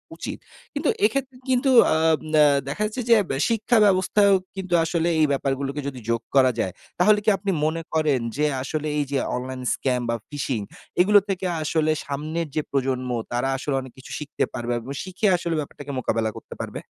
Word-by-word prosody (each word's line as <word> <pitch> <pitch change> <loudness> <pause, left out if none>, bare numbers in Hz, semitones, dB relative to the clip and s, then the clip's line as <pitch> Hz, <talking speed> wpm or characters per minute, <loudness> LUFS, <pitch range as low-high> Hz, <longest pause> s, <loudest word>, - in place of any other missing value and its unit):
উচিৎ। - - -6 0.3
কিন্তু 290 +1 0 0.2
এক্ষেত্রে 265 +2 -1
কিন্তু 260 +1 +3 0.2
আম 160 0 +3 0.2
আ - - +8 0.2
দেখা 145 +9 -4
যাচ্ছে 215 +4 -3
যে 230 - +8
বে 135 - -1
শিক্ষা 230 +1 +2
ব্যবস্থায়ও 195 +1 +4 0.2
কিন্তু 185 -2 -4
আসলে 165 0 0
এই 155 - +5
ব্যাপারগুলোকে 140 +1 -1
যদি 130 -3 -5
যোগ 115 0 +1
করা 130 -1 +6
যায়, 95 - -1 0.3
তাহলে 210 +3 +5
কি 215 - +3
আপনি 200 -1 -2
মনে 165 +1 -1
করেন 155 -5 +2 0.2
যে 150 - +2 0.2
আসলে 155 +2 -3
এইযে 140 -1 -1 0.2
অনলাইন 130 +1 -5
স্ক্যাম 125 -2 -1
বা 115 - +1
phishing 135 -6 -2 0.4
এগুলো 205 +3 +6
থেকে 190 -1 -2 0.2
আসলে 155 0 +1
সামনের 155 +4 -3
যে 155 - +2
প্রজন্ম, 130 -2 -1 0.2
তারা 125 +2 0
আসলে 135 +1 -2
অনেক 130 - -10
কিছু 130 - -12
শিখতে 150 -1 -3
পারবে 120 -1 -3
এবং 125 +4 -8
শিখে 190 +3 -1
আসলে 170 -1 -2
ব্যাপারটাকে 145 -1 -6
মোকাবেলা 115 -2 0
করতে - - -10
পারবে? - - -6
155 Hz, 180 wpm, -24 LUFS, 135-185 Hz, 0.4 s, আ